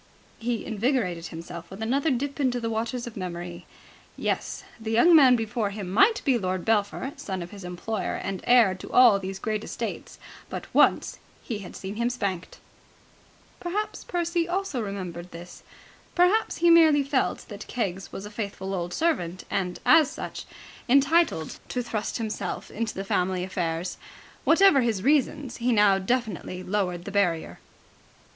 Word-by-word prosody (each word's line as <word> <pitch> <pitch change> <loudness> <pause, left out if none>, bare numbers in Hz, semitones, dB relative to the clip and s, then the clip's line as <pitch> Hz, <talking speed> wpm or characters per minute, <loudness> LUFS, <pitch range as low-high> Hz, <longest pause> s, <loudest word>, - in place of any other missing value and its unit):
He 235 0 -2
invigorated 215 -7 -1
himself 170 0 -8
with 190 - -10
another 270 +8 +1
dip 280 +2 -2
into 255 -3 +1
the 230 -1 -2
waters 235 +2 -2
of 240 - -8
memory. 175 -2 -6 0.5
Yes. - - -2 0.2
The 220 -1 -5
young 240 +10 +6
man 265 -5 +8
before 225 -2 -1
him 200 -3 -6
might 395 - +4
be 260 -4 +3
Lord 185 -2 -2
Belpher, 225 +5 0
son 190 -3 -4
of 170 - -10
his 200 -2 -10
employer 180 +3 -3
and 195 -1 -4
heir 240 -6 +6
to 185 - -9
all 240 -5 +7
these 190 0 -5
great 215 +1 -2
estates, - - -5 0.3
but - - -5
once - - +3 0.2
he 220 -4 -4
had 195 - -9
seen 195 +2 -6
him 235 +1 +1
spanked. 200 -8 -3 1.0
Perhaps 405 +5 -3
Percy 340 -1 -1
also 360 -8 -1
remembered 180 -4 -5
this. 175 +1 -11 0.5
Perhaps 365 +5 +3
he 340 - +7
merely 315 -4 +6
felt 275 -1 -1
that 210 -1 -8
Keggs 195 -6 -3
was 195 - -7
a 210 - -9
faithful 200 -2 -4
old 175 -1 -3
servant 185 - 0
and, 180 -2 -1
as 320 -4 +6
such, - - -7 0.4
entitled 275 - +3
to 250 - -2
thrust 215 -3 -3
himself 220 -2 -4
into 225 +1 -3
the 195 - -4
family 185 -1 0
affairs. 175 -2 -3 0.5
Whatever 335 -4 +6
his 225 -6 0
reasons, 285 -1 +1
he 245 +1 0
now 205 -3 +5
definitely 195 -4 -2
lowered 180 -3 -2
the 200 - -5
barrier. 180 -5 0
215 Hz, 160 wpm, -26 LUFS, 185-255 Hz, 1.0 s, man